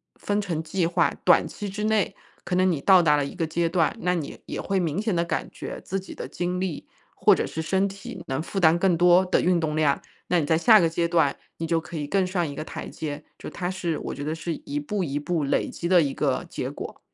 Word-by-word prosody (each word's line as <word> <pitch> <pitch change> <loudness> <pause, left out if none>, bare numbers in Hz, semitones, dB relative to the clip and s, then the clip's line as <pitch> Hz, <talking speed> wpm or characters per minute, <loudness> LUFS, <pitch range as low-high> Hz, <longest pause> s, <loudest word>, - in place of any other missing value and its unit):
分 205 0 -1
成 165 -5 -3
计 165 +1 0
划， 170 - +2
短 - - +6
期 205 -2 -6
之 205 +2 -4
内 215 -2 +1 0.3
可 180 - -1
能 185 0 +3
你 155 - -1
到 185 -3 +6
达 150 -2 +4
了 145 - 0
一 140 - -7
个 165 -3 -1
阶 165 +1 0
段， 165 -3 +2
那 180 0 +1
你 155 -4 -5
也 - - -5
会 195 -1 0
明 165 +1 -1
显 220 -3 0
地 170 - +2
感 - - -2
觉 - - -7
自 195 +1 -2
己 190 - -10
的 - - -6
精 180 +1 -2
力， 185 -5 -4 0.3
或 - - +5
者 - - -1
是 160 - -4
身 190 +4 +1
体 195 0 -8
能 135 +3 -1
负 195 - -7
担 170 0 +5
更 185 -2 +3
多 180 +2 +5
的 185 - +2
运 180 -1 +3
动 155 -2 -1
量， 150 -3 +2 0.3
那 175 - +3
你 150 - 0
在 160 +1 +3
下 220 +5 +7
个 165 - +3
阶 170 +1 0
段， 160 -5 +3 0.2
你 165 - -3
就 165 0 +2
可 170 - -8
以 145 -1 -3
更 195 +3 +2
上 180 -2 -1
一 145 - -6
个 155 - -4
台 - - -7
阶， 150 -1 -6
就 - - -7
它 175 - -4
是 175 -4 -2
我 - - -5
觉 145 - -6
得 155 - -2
是 165 0 -4
一 145 0 -4
步 195 +7 -2
一 145 -3 -2
步 160 0 -1
累 140 - 0
积 170 - -4
的 180 -2 +6
一 140 -2 0
个 - - 0
结 - - -4
果。 - - -8
170 Hz, 285 characters per minute, -25 LUFS, 155-185 Hz, 0.3 s, 下